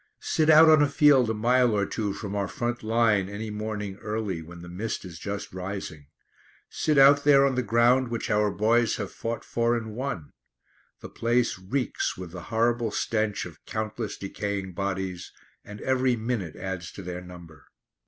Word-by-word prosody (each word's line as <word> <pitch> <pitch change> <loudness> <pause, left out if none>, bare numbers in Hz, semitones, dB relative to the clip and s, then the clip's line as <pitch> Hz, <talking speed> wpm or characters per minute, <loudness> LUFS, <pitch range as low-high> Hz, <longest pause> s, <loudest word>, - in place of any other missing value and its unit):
Sit 155 0 +1
out 160 +1 +8
on 155 -1 +7
a 145 - +3
field 140 -4 +5
a - - +1
mile 120 0 +3
or 100 - +1
two 105 0 -2
from 100 0 -6
our 100 -1 -1
front 120 +7 -3
line 110 -3 +2
any 105 +2 -5
morning 105 -2 -4
early, 105 -6 -3
when 85 +1 -11
the - - -9
mist 100 +4 -4
is 85 -3 -9
just 100 +1 -5
rising. 90 -6 -6 0.6
Sit 155 -2 0
out 140 +1 +7
there 140 -1 +6
on 135 - +1
the 125 - 0
ground 120 +3 +3
which 115 -1 -3
our 105 0 +3
boys 115 +3 +2
have 100 -3 -5
fought 115 0 -5
for 120 0 +1
and 110 -2 -6
won. 125 - -4 0.7
The - - -8
place 120 -3 0
reeks 125 +8 -2
with 90 -2 -8
the 90 0 -8
horrible 115 0 +1
stench 110 0 -1
of 85 -2 -12
countless 110 0 -4
decaying 100 -1 -4
bodies, 95 -2 -4 0.3
and 105 0 -10
every 130 -1 +2
minute 110 -7 -3
adds 95 -3 -5
to 100 - -9
their 90 0 -5
number. 85 -4 -13
110 Hz, 180 wpm, -26 LUFS, 95-120 Hz, 0.7 s, out